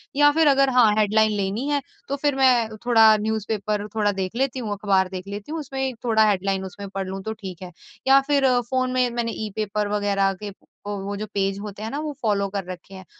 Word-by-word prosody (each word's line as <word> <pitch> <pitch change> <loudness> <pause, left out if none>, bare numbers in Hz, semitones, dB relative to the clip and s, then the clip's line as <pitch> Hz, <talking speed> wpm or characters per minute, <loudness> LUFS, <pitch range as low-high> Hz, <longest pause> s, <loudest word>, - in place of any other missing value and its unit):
या 290 +1 +6
फ़िर 320 +1 +3
अगर 275 -1 +4
हाँ 235 -3 +7
हेडलाइन 215 +1 +3
लेनी 200 +7 -2
है 285 -1 +1 0.3
तो 280 - -1
फ़िर 285 0 0
मैं 245 -5 +3
थोड़ा 225 -3 +6
न्यूज़ 220 -1 -2
पेपर 210 -1 -2
थोड़ा 210 -2 +2
देख 190 +1 -4
लेती 260 +1 -1
हूँ, 220 -4 -4
अख़बार 195 -2 +1
देख 185 0 -7
लेती 205 +6 -7
हूँ। 325 - -3
उसमें 265 -2 -3
थोड़ा 220 -2 +4
हेडलाइन 195 -1 0
उसमें 200 +1 -8
पढ़ 195 -1 -4
लूँ 190 +1 -5
तो 220 - -3
ठीक 190 -5 -9
है। 180 -1 -8 0.4
या 270 +1 +7
फ़िर 285 -2 +3 0.2
फ़ोन 255 -1 0
में 255 -1 +2
मैंने 235 -1 -2
ई - - -5
पेपर 210 -1 -1
वग़ैरह 195 -1 +1
के 205 - -4 0.4
वो 200 0 -4
जो 215 - -4
पेज 195 -1 0
होते 205 0 -7
हैं 220 - -3
ना 280 - -3
वो 305 0 -3
फ़ॉलो 205 -4 +1
कर 200 0 -3
रखे 180 +2 -11
हैं। 190 -1 -11
215 Hz, 225 wpm, -23 LUFS, 195-255 Hz, 0.4 s, हाँ